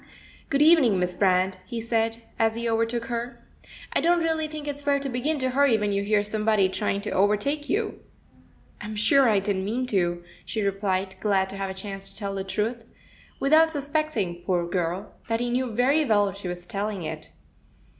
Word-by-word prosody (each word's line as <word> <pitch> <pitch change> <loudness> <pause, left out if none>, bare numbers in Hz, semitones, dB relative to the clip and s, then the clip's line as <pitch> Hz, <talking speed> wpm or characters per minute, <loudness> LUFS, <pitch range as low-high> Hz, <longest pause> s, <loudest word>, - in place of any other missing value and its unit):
"Good 280 +1 +3
evening, 300 - +6
Miss 180 0 0
Brand," 185 0 +2
he 235 -2 -5
said, 225 0 -1 0.2
as 225 0 +2
he 235 0 -2
over 230 0 +1
took 235 0 -3
her. 235 0 -5 0.5
"I - - +2
don't 345 0 +3
really 320 -1 0
think 305 -1 -7
it's 290 0 -4
fair 285 -1 +1
to 275 0 -4
begin 270 +5 0
to 260 -2 0
hurry 270 -3 +4
when 210 -1 -1
you 200 0 0
hear 205 0 +2
somebody 210 -2 +2
trying 200 0 -1
to 210 - -3
overtake 210 +10 +1
you. 425 +1 -1 0.8
"I'm 215 +1 -6
sure 250 +5 +4
I 210 - +3
didn't 195 -1 -1
mean 235 +6 -1
to," 175 -2 +1 0.2
she 220 - -3
replied, 195 -1 -1
glad 195 -2 +1
to 195 - -7
have 195 0 -3
a 190 - -6
chance 195 0 -6
to 195 - -17
tell 200 -2 -4
the 195 -1 -3
truth, 220 +4 -2 0.6
without 315 +3 +5
suspecting, 285 - -2
poor 175 -2 0
girl, 175 +2 -2
that 225 0 0
he 240 0 -1
knew 255 +1 0
very 255 +7 +2
well 205 -6 +2
she 200 -1 -7
was 175 0 -6
telling 200 0 -3
it. 155 0 -6
215 Hz, 195 wpm, -25 LUFS, 195-260 Hz, 0.8 s, evening